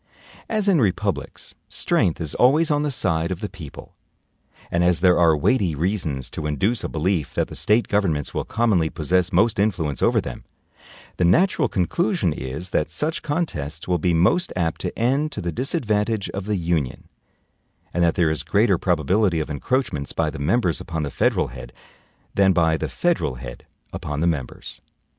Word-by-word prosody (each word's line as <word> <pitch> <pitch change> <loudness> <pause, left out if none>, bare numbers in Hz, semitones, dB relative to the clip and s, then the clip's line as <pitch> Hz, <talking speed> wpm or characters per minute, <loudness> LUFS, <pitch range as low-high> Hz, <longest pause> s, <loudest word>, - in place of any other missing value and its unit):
As 215 -2 0
in 180 -8 +4
republics 95 -5 -2
strength 85 - +1
is 80 -3 -4
always 150 +6 +4
on 145 0 +2
the 150 - 0
side 85 - 0
of 90 - -3
the 105 - -3
people, 90 -7 -11 0.8
and 85 +1 +2
as 90 -1 +2
there 90 -2 +5
are 80 -3 +5
weighty 90 - +1
reasons 80 -5 -2
to 75 - -4
induce 95 - 0
a - - -3
belief 80 -1 -1
that - - 0
the - - -8
State 110 +3 +2
governments 85 -9 0
will - - -1
commonly 105 -8 +1
possess 90 +4 0
most 100 +4 +2
influence 90 -9 0
over - - +3
them, - - -6 0.7
the - - +1
natural 175 - +3
conclusion 170 - 0
is 75 +7 -5
that 75 - 0
such 150 - -1
contests 80 - -3
will 90 -1 +1
be 90 +3 +1
most 95 - +2
apt 85 -3 -1
to - - -4
end 135 +6 +1
to - - -5
the 85 - -2
disadvantage 110 - -1
of 100 0 -5
the 105 -1 0
Union; 85 -6 -2 0.9
and 90 - +1
that 85 -1 +2
there 85 -3 +2
is 80 - -2
greater 100 -4 +2
probability 90 +2 +1
of 75 - -3
encroachments 75 - -2
by - - 0
the - - -8
members 90 +2 +1
upon 80 -2 -4
the 70 - -4
federal - - +1
head, 65 +1 -10 0.6
than 95 -1 +4
by 80 -2 +3
the - - -3
federal 170 - 0
head - - -9 0.3
upon 75 -1 -4
the 80 - +1
members. 75 -7 -3
90 Hz, 180 wpm, -22 LUFS, 80-110 Hz, 0.9 s, there